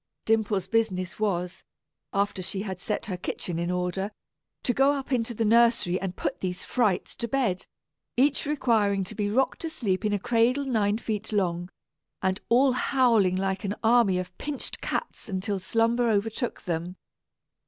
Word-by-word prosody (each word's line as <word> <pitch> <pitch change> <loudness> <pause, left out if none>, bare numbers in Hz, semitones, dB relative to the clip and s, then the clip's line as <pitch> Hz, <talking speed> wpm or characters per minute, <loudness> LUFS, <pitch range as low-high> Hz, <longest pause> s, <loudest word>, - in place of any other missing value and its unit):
Dimple's 215 -4 +1
business 190 -5 0
was, 180 -4 -1 0.5
after 200 -1 0
she 190 +2 -3
had 190 -3 -5
set 210 +3 -2
her 190 -5 -3
kitchen 175 -1 -4
in 170 0 -1
order, 180 +2 -1 0.5
to 245 - +1
go 270 +3 +4
up 275 -1 -5
into 240 -2 0
the 225 - 0
nursery 230 -5 +4
and 190 -2 -3
put - - -3
these 180 -1 -3
frights 215 -8 0
to 235 - -3
bed, 230 -7 0 0.5
each 280 +2 +3
requiring 220 -9 +2
to 185 - -6
be 205 -1 -1
rocked 255 +4 +1
to 330 - -2
sleep 205 -10 -1
in 210 - +1
a 205 - +2
cradle 240 +6 +2
nine 215 -5 +1
feet 220 -1 -4
long, 175 -4 0 0.5
and 190 +1 0
all 260 +3 +5
howling 240 -7 +3
like 190 +1 -1
an 200 0 -2
army 225 -5 +4
of 180 0 -5
pinched 290 -2 -4
cats 475 - -3
until 195 +1 -2
slumber 230 +5 +2
overtook 220 +3 -1
them. 175 0 -3
210 Hz, 165 wpm, -27 LUFS, 185-235 Hz, 0.5 s, all